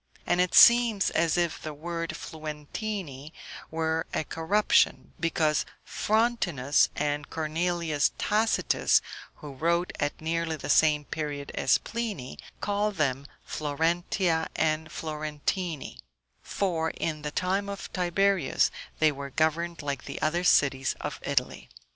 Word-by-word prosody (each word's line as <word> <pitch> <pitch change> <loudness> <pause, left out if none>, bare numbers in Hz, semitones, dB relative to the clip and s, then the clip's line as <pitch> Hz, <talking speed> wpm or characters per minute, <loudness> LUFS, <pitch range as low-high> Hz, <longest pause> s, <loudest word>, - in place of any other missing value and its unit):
And 180 - +2
it 180 - +1
seems 235 -4 +7
as 165 +1 +1
if 170 -2 0
the 155 -1 -6
word 165 +2 -4
Fluentini 155 - -6 0.4
were 160 0 -1
a - - 0
corruption, 165 +8 +1
because 160 -2 +1 0.2
Frontinus 200 - +1
and 145 0 -2
Cornelius 160 -1 0
Tacitus, 220 +1 +2 0.3
who 145 -2 -9
wrote 170 +5 0
at 145 - -1
nearly 165 0 -1
the 150 - -3
same 150 -2 +4
period 145 -2 -4
as - - +3
Pliny, 215 - -5 0.2
call 205 +1 0
them 140 -6 -1 0.2
Florentia 165 +3 0
and 155 0 0
Florentini; 155 +1 -4 0.4
for, 165 -5 -1
in 155 -1 -3
the 150 - -3
time 190 +5 -1
of 200 -3 -7
Tiberius, 185 -3 +2 0.3
they 155 -1 +4
were 140 -1 -7
governed 160 +3 0
like 140 -3 -3
the 140 - -6
other 170 +3 0
cities 135 -6 +3
of - - -5
Italy. - - -2
160 Hz, 125 wpm, -27 LUFS, 150-180 Hz, 0.4 s, seems